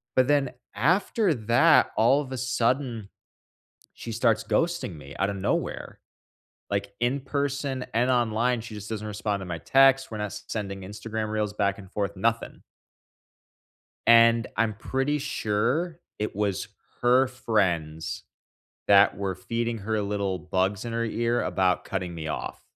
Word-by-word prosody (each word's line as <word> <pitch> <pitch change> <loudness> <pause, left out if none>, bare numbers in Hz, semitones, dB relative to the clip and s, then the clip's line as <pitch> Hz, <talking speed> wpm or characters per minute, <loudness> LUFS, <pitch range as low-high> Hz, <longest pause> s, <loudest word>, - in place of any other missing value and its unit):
But 130 0 +4
then 145 -3 +2 0.2
after 180 - +2
that, 120 +6 +4
all 120 +7 +4
of 135 -2 -8
a 130 - -3
sudden, 125 -3 -1 0.9
she 115 - -7
starts 115 -1 +2
ghosting 170 - 0
me 70 -2 -11
out 95 +2 +1
of 100 - -4
nowhere, 95 - -2 0.7
like, 100 0 -2
in 125 +4 +1
person 140 -1 -2
and 120 +3 +2
online, 120 0 +1
she 110 -1 -9
just 105 -1 -8
doesn't 110 -1 -4
respond 105 -1 -2
to - - -6
my 85 -1 -4
texts. 135 - +4
We're 110 - -5
not 105 -1 -3 0.2
sending 100 -3 -4
Instagram 105 +2 -5
reels 105 -1 -1
back 100 -1 0
and 95 -2 -12
forth, 100 -2 -2
nothing. 115 +3 -1 1.5
And 115 -1 +6
I'm 110 -1 +2
pretty 135 +6 -1
sure 140 +9 -1 0.2
it 105 -2 -3
was 100 -2 -1 0.3
her 125 +2 +4
friends 90 -10 -1 0.6
that 100 0 +6
were 100 -2 -2
feeding 115 +3 -3
her 110 +1 -1
little 100 -2 -1
bugs 95 +3 -1
in 115 - -4
her 115 0 0
ear 115 +1 0
about 95 -2 +1
cutting 90 -3 -3
me 80 -1 -5
off. - - -5
110 Hz, 150 wpm, -26 LUFS, 100-125 Hz, 1.5 s, And